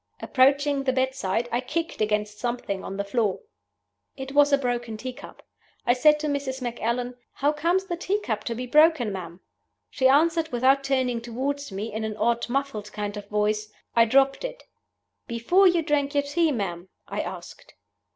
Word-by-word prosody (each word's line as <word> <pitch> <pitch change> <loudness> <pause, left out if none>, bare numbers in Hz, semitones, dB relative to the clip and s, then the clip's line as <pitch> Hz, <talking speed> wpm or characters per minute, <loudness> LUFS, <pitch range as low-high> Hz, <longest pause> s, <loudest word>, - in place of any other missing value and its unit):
Approaching 280 +2 +3
the 260 - +2
bedside, 260 -4 0
I 240 - 0
kicked 330 +2 -3
against 210 0 -1
something 240 -5 -3
on 195 - -6
the 200 - -1
floor. 205 -1 -1 0.8
It 265 0 -6
was 290 +1 +4
a 280 - +5
broken 240 -4 -2
tea 255 +3 -5
cup. 280 - -13 0.4
I 240 - +4
said 300 +4 +4
to 305 - -1
Mrs. 280 -2 -2
Macallan, 245 0 -2 0.2
'How 285 +2 +1
comes 340 +5 0
the 350 - -3
tea 385 +4 -1
cup 220 - -3
to 230 - -2
be 250 +2 -4
broken, 300 -4 +4
ma'am?' 175 -1 -7 0.5
She 260 -2 +3
answered, 320 +4 +3
without 265 +3 +3
turning 260 -3 0
toward 270 +3 -3
me, 205 +3 -5
in 220 +1 -3
an 220 -1 -4
odd, 235 +1 0
muffled 255 -6 -2
kind 205 0 -4
of 205 -1 -8
voice, 210 0 0 0.2
'I 230 -1 +6
dropped 270 - +3
it.' - - -6 0.6
'Before 295 +12 +3
you 345 -2 +3
drank 290 -1 0
your 285 - +3
tea, 315 +3 +1
ma'am?' 185 -7 -4 0.2
I - - -3
asked. - - -9
255 Hz, 180 wpm, -25 LUFS, 220-285 Hz, 0.8 s, I